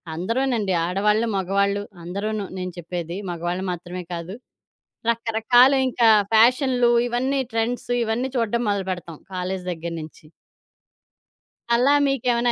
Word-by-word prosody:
అందరూనండి. 230 +1 0
ఆడవాళ్ళు, 210 +5 +1
మగవాళ్ళు 200 +2 0 0.2
అందరూను, 205 +4 -3 0.2
నేను 180 -1 -4
చెప్పేది 175 +1 -5
మగవాళ్ళు 175 +2 -3
మాత్రమే 175 +1 -6
కాదు. 170 +4 -6 0.7
రకరకాలు 235 +3 +4
ఇంకా 235 -2 +3 0.2
ఫ్యాషన్లు 245 +2 +4 0.2
ఇవన్నీ 260 +3 0
ట్రెండ్స్ 230 +2 -2
ఇవన్నీ 235 +4 -1
చూడడం 235 +1 0
మొదలుపెడతాం. 185 -5 -3 0.2
కాలేజి 185 0 -3
దగ్గర 170 0 -5
నుంచి. 155 0 -12 1.5
అలా 255 +4 +4
మీకేమైనా 245 -3 +1
210 Hz, 105 wpm, -23 LUFS, 180-240 Hz, 1.5 s, రకరకాలు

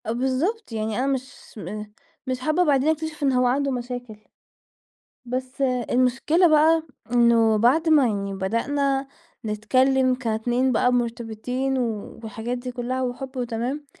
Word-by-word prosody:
آه 220 - -2
بالضبط 265 - -1
يعني 220 0 -2
أنا 265 - 0
مش 260 -2 -2 0.2
م 210 0 -5 0.4
مش 255 -1 -2
حابّة 310 +7 +2
بعدين 290 -2 +3
أكتشف 315 -1 -2
إن 275 - +3
هو 250 -1 +2
عنده 275 +2 +1
مشاكل، 245 -2 -5 1.1
بس 255 +2 -4
آآ 250 -3 +1
المشكلة 260 +8 +3
بقى، 315 +1 +4 0.3
إنّه 235 -2 +4
بعد 275 +9 +3
ما 295 -5 +5
يعني 200 -2 -2
بدأنا 270 +8 -1 0.4
نتكلّم 255 +5 +2
كاتنين 245 +1 0
بقى 250 +1 +2
مرتبطين 240 +2 -2
و 225 -5 -3
والحاجات 225 +3 -4
دي 250 +1 -6
كلّها 250 +1 -3
وحُب 260 +1 -4
وتمام، 245 +4 -3
255 Hz, 140 wpm, -24 LUFS, 235-270 Hz, 1.1 s, ما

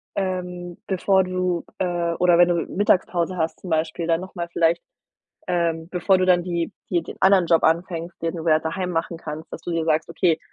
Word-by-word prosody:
ähm, 180 -2 -3
bevor 190 0 +2
du, 185 -1 -1
äh, 175 -2 0
oder 175 -1 +4
wenn 175 - +7
du 175 - +2
Mittagspause 185 -3 +1
hast, 160 -1 -2
zum 185 - -8
Beispiel, 160 +1 -1
da 165 -1 +3
noch 185 +2 -9
mal 170 -1 -3
vielleicht, 170 0 +2 0.7
ähm, 165 -2 0
bevor 185 +1 +2
du 185 - +1
dann 180 -1 +4
die 170 -2 -2 0.2
die 175 -2 +1
den - - -9
anderen 190 -2 +5
Job 165 0 +3
anfängst, 170 +1 0
den 165 +1 -1
du 165 0 -6
ja 155 -1 +5
daheim 180 +3 -3
machen 165 0 -2
kannst, 155 0 -7
dass - - -7
du - - -5
dir 165 -1 0
sagst: 155 0 +1
„Okay, 170 -1 +2
175 Hz, 205 wpm, -23 LUFS, 165-180 Hz, 0.7 s, wenn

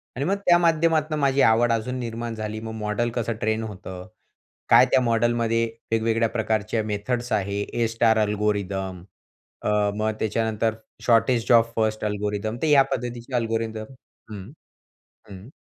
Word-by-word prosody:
आणि 135 +4 -2
मग 195 +3 +1
त्या 175 -1 +6
माध्यमातून 160 -2 +2
माझी 140 -1 +2
आवड 115 +2 +4
अजून 125 +3 -2
निर्माण 115 -1 -4
झाली. 110 0 -5
मग 110 0 -6
मॉडेल 105 +3 -1
कसं 115 -1 -1
ट्रेन 110 +1 0
होतं? 95 -3 -8 0.6
काय - - +7
त्या 130 - +4
मॉडेलमध्ये 115 -1 +1 0.3
वेगवेगळ्या 115 0 +1
प्रकारचे 110 -1 -1
मेथड्स 120 +4 -3
आहे? 100 0 -1
ए 115 +2 -1
स्टार 115 0 +2
अल्गोरिदम 100 -3 -1 0.6
अ, - - 0 0.3
मग 110 +1 0
त्याच्यानंतर 110 0 0 0.3
शॉर्टेज 115 0 +3
ओफ 115 0 +4
फर्स्ट 110 -1 0
अल्गोरिदम 105 +1 -2
तर 160 - +1
या 145 -2 +6
पद्धतीचे 120 +1 -4
अल्गोरिदम 115 -1 -2 0.5
हं, 100 +2 -8 0.8
हं. 95 +4 -11
115 Hz, 140 wpm, -24 LUFS, 105-120 Hz, 0.8 s, काय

